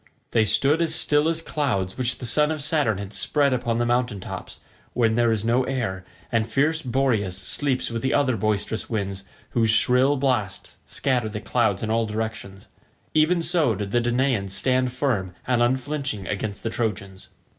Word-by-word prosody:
They 110 Hz, -1 st, +3 dB
stood 140 Hz, +9 st, +3 dB
as 165 Hz, -, +1 dB
still 150 Hz, +2 st, +2 dB
as 165 Hz, 0 st, -1 dB
clouds 110 Hz, -, -1 dB
which 120 Hz, -2 st, -1 dB
the -, -, -7 dB
son 150 Hz, +6 st, +2 dB
of 155 Hz, -3 st, -3 dB
Saturn 145 Hz, -9 st, +1 dB
has 100 Hz, +1 st, -7 dB
spread 145 Hz, -3 st, +1 dB
upon 120 Hz, -2 st, -1 dB
the 120 Hz, -, +1 dB
mountain 120 Hz, -3 st, 0 dB
tops -, -, -8 dB, 0.3 s
when 115 Hz, -2 st, +2 dB
there 120 Hz, 0 st, +3 dB
is 110 Hz, -1 st, -1 dB
no 120 Hz, +3 st, +3 dB
air 115 Hz, -9 st, -2 dB, 0.3 s
and 115 Hz, -1 st, +1 dB
fierce 150 Hz, +6 st, +1 dB
Boreas 120 Hz, -, 0 dB
sleeps 130 Hz, +7 st, -2 dB
with 115 Hz, -1 st, -3 dB
the 130 Hz, -, 0 dB
other 140 Hz, -4 st, +2 dB
boisterous 110 Hz, +1 st, -1 dB
winds 100 Hz, -3 st, -3 dB, 0.3 s
whose 115 Hz, -2 st, +2 dB
shrill 125 Hz, +5 st, +4 dB
blasts 125 Hz, -8 st, -2 dB
scatter 125 Hz, -5 st, 0 dB
the 105 Hz, 0 st, -5 dB
clouds 110 Hz, -3 st, 0 dB
in 110 Hz, -, -1 dB
all 115 Hz, 0 st, +1 dB
directions—even 110 Hz, -, -2 dB
so 160 Hz, -, +2 dB
did 100 Hz, 0 st, -4 dB
the 120 Hz, -, +2 dB
Danaans 120 Hz, -5 st, 0 dB
stand 130 Hz, +4 st, +1 dB
firm 115 Hz, -9 st, -1 dB
and 120 Hz, -1 st, +1 dB
unflinching 130 Hz, -4 st, -1 dB
against 100 Hz, 0 st, -4 dB
the 115 Hz, -, -2 dB
Trojans. 100 Hz, -5 st, -4 dB
120 Hz, 175 wpm, -24 LUFS, 105-135 Hz, 0.3 s, shrill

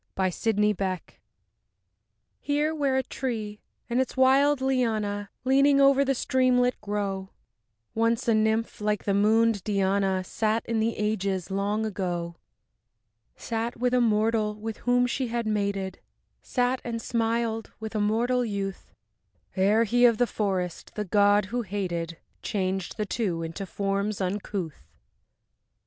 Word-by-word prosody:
VINE 190 Hz, -, +2 dB
AND 185 Hz, -, 0 dB
SYCAMORE 210 Hz, -3 st, +1 dB
I 185 Hz, -, -6 dB, 1.4 s
Here 295 Hz, +2 st, 0 dB
where 280 Hz, -4 st, 0 dB
a 265 Hz, -, +1 dB
tree 220 Hz, -5 st, -4 dB, 0.3 s
and 245 Hz, +2 st, +1 dB
its 260 Hz, -, -4 dB
wild 270 Hz, +2 st, +4 dB
liana, 220 Hz, -6 st, 0 dB
Leaning 275 Hz, +2 st, +4 dB
over 275 Hz, 0 st, +5 dB
the 270 Hz, 0 st, +1 dB
streamlet, 250 Hz, 0 st, +2 dB
grow, 200 Hz, -2 st, -3 dB, 0.6 s
Once 230 Hz, +1 st, +1 dB
a 230 Hz, -, +4 dB
nymph, 220 Hz, +1 st, 0 dB
like 210 Hz, -1 st, 0 dB
the 200 Hz, -, 0 dB
moon'd 215 Hz, 0 st, +3 dB
Diana, 195 Hz, -2 st, +1 dB
Sat 220 Hz, +4 st, -1 dB
in 230 Hz, -1 st, -1 dB
the 225 Hz, +1 st, 0 dB
ages 200 Hz, -3 st, -1 dB
long 205 Hz, +3 st, 0 dB
ago, 175 Hz, -4 st, -3 dB, 1.0 s
Sat 230 Hz, +1 st, -3 dB
with 250 Hz, +1 st, 0 dB
a 250 Hz, -, +4 dB
mortal 215 Hz, -1 st, +2 dB
with 220 Hz, +1 st, -6 dB
whom 245 Hz, 0 st, +2 dB
she 250 Hz, +1 st, -1 dB
had 235 Hz, 0 st, -2 dB
mated, 200 Hz, -3 st, -1 dB, 0.4 s
Sat 250 Hz, 0 st, 0 dB
and 235 Hz, -1 st, -3 dB
smiled 230 Hz, -1 st, -1 dB
with 220 Hz, 0 st, -6 dB
a 215 Hz, -, 0 dB
mortal 240 Hz, +4 st, +1 dB
youth, 200 Hz, -3 st, -4 dB, 0.6 s
Ere 205 Hz, +4 st, +4 dB
he 245 Hz, +2 st, +3 dB
of 235 Hz, -2 st, +5 dB
the 245 Hz, -, +3 dB
forest, 190 Hz, -6 st, -3 dB
the 210 Hz, -, -2 dB
god 205 Hz, +1 st, +4 dB
who 245 Hz, -, +1 dB
hated, 175 Hz, -5 st, -3 dB, 0.2 s
Changed 190 Hz, -2 st, -2 dB
the 210 Hz, -, -1 dB
two 185 Hz, -6 st, -2 dB
into 165 Hz, +4 st, -5 dB
forms 200 Hz, +2 st, -2 dB
uncouth.... 185 Hz, -, -4 dB
215 Hz, 140 wpm, -26 LUFS, 200-240 Hz, 1.4 s, over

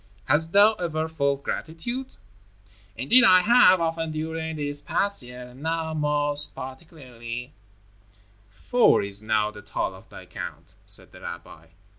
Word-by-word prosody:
Hast 150 Hz, +5 st, +1 dB
thou 205 Hz, +3 st, +6 dB
ever 160 Hz, -2 st, -2 dB
felt 140 Hz, -3 st, -1 dB
gratitude?" 240 Hz, +12 st, -4 dB, 0.8 s
"Indeed 190 Hz, -, +5 dB
I 185 Hz, -5 st, +7 dB
have, 210 Hz, -3 st, +6 dB
often 165 Hz, -1 st, -1 dB
during 160 Hz, +1 st, -4 dB
this 145 Hz, -1 st, -4 dB
past 200 Hz, +3 st, 0 dB
year, 125 Hz, 0 st, -9 dB
and 125 Hz, +2 st, -15 dB
now 160 Hz, 0 st, -2 dB
most 145 Hz, -1 st, 0 dB
particularly." 130 Hz, -3 st, -8 dB, 1.0 s
"Four 235 Hz, -, +3 dB
is 100 Hz, 0 st, 0 dB
now 110 Hz, -1 st, 0 dB
the 105 Hz, -, -11 dB
toll -, -, -3 dB
of -, -, -16 dB
thy -, -, -11 dB
count," -, -, -8 dB
said -, -, -4 dB
the -, -, -14 dB
rabbi. 80 Hz, +1 st, -9 dB
155 Hz, 140 wpm, -25 LUFS, 130-165 Hz, 1.0 s, I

